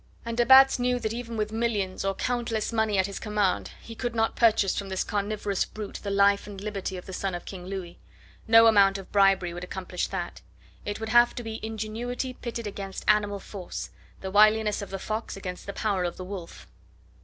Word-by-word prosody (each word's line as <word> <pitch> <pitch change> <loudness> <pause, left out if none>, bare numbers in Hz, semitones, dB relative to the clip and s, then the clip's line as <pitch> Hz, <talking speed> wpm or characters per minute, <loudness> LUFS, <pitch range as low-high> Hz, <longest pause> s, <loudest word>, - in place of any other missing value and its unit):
And 230 0 -3
de 240 0 +2
Batz 265 0 +8
knew 250 0 +1
that 220 -2 -3
even 235 -1 -5
with 215 0 -1
millions 220 -5 -1
or 195 0 0
countless 235 -2 -2
money 220 -2 +1
at 190 - +3
his 200 0 -5
command 210 -3 0
he 230 - -9
could 240 +1 -4
not 225 0 +1
purchase 215 -5 +3
from 200 -1 -4
this 190 -1 -1
carnivorous 205 -1 -1
brute 210 -2 -7
the 200 - -4
life 200 0 +3
and 200 -2 -8
liberty 195 -2 -4
of 180 - -9
the 190 - -8
son 190 0 -2
of 175 - -7
King 180 -2 -8
Louis. 185 -3 -6 0.5
No 225 0 +8
amount 200 -3 +5
of 195 -1 -11
bribery 195 -3 +3
would 175 +1 -6
accomplish 180 -1 -4
that; 180 -3 -5 0.4
it 205 - -3
would 220 0 -4
have 240 +1 +5
to 240 - -5
be 225 0 -5
ingenuity 225 +4 -4
pitted 235 -2 -6
against 195 -2 -6
animal 205 -1 +3
force, 190 -2 -7 0.3
the 190 - -5
wiliness 215 +1 +4
of 200 - -6
the 195 - -4
fox 215 +2 -4
against 180 -1 -7
the 200 - -4
power 200 -4 0
of 175 -1 -3
the 185 - -6
wolf. 185 -3 -8
205 Hz, 210 wpm, -27 LUFS, 195-225 Hz, 0.5 s, Batz